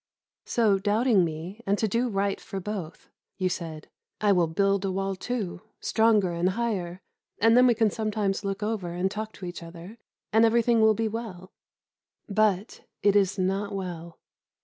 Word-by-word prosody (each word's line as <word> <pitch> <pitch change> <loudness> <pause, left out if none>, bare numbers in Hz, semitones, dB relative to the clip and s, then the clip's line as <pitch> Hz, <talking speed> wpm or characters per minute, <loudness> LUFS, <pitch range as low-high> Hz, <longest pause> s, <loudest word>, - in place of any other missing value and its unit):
So, 215 -5 +2
doubting 210 0 +3
me, 170 +6 -5
and 200 +1 +2
to 220 - +1
do 235 +4 0
right 200 -1 -1
for 195 - -6
both, 190 -4 -6 0.3
you 185 -1 0
said, 165 -4 -6 0.3
"I 210 -1 +3
will 175 -3 +3
build 195 +4 +1
a 195 - -1
wall 195 +1 -2
too, 200 -4 -4 0.2
stronger 220 -5 +3
and 170 +2 +1
higher, 190 -4 -3 0.3
and 225 +1 +4
then 250 +1 +7
we 240 - +4
can 220 -2 +2
sometimes 210 -2 -1
look 195 +1 -3
over 205 -5 -2
and 185 +2 -1
talk 215 +1 -4
to 190 - -9
each 175 0 -6
other, 170 +6 -11 0.3
and 220 +1 +5
everything 230 0 +4
will 220 0 +5
be 225 +1 0
well." 210 -5 -6 0.8
But 210 -1 0 0.2
it 205 -1 +4
is 195 0 +3
not 195 +2 -1
well. 170 -3 -6
200 Hz, 170 wpm, -27 LUFS, 185-220 Hz, 0.8 s, then